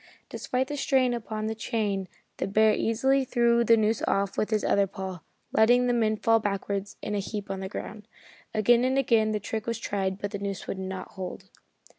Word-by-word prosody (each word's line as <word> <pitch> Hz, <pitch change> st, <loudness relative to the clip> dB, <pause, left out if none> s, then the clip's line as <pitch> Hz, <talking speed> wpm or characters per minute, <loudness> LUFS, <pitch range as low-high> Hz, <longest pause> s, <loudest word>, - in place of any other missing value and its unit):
Despite 255 Hz, +1 st, -2 dB
the 290 Hz, -, -4 dB
strain 260 Hz, -3 st, +2 dB
upon 215 Hz, -2 st, -4 dB
the 220 Hz, -, -1 dB
chain 210 Hz, -4 st, -2 dB, 0.3 s
the -, -, -2 dB
bear 215 Hz, +2 st, +4 dB
easily 265 Hz, +6 st, +2 dB
threw 235 Hz, -2 st, +3 dB
the 230 Hz, 0 st, +5 dB
noose 220 Hz, 0 st, +1 dB
off 195 Hz, 0 st, 0 dB
with 215 Hz, -, 0 dB
his 215 Hz, -2 st, 0 dB
other 200 Hz, -1 st, +3 dB
paw, 190 Hz, -1 st, -6 dB, 0.3 s
letting 245 Hz, +3 st, +4 dB
the 245 Hz, -, +2 dB
men 220 Hz, -2 st, +1 dB
fall 225 Hz, +1 st, +3 dB
backwards 200 Hz, -1 st, -3 dB
in 210 Hz, -, -3 dB
a 205 Hz, -, 0 dB
heap 200 Hz, 0 st, -5 dB
on 195 Hz, -, -3 dB
the 190 Hz, 0 st, -5 dB
ground. 210 Hz, +1 st, -7 dB, 0.4 s
Again 235 Hz, +3 st, +4 dB
and 260 Hz, +1 st, +1 dB
again 230 Hz, -5 st, +3 dB
the 210 Hz, -, -1 dB
trick 220 Hz, +2 st, -4 dB
was 230 Hz, -1 st, -1 dB
tried 195 Hz, -4 st, -2 dB
but 205 Hz, 0 st, -4 dB
the 200 Hz, -, -4 dB
noose 200 Hz, -2 st, -4 dB
would 190 Hz, -, -4 dB
not 190 Hz, 0 st, -5 dB
hold. 185 Hz, -1 st, -8 dB
215 Hz, 205 wpm, -27 LUFS, 200-235 Hz, 0.4 s, the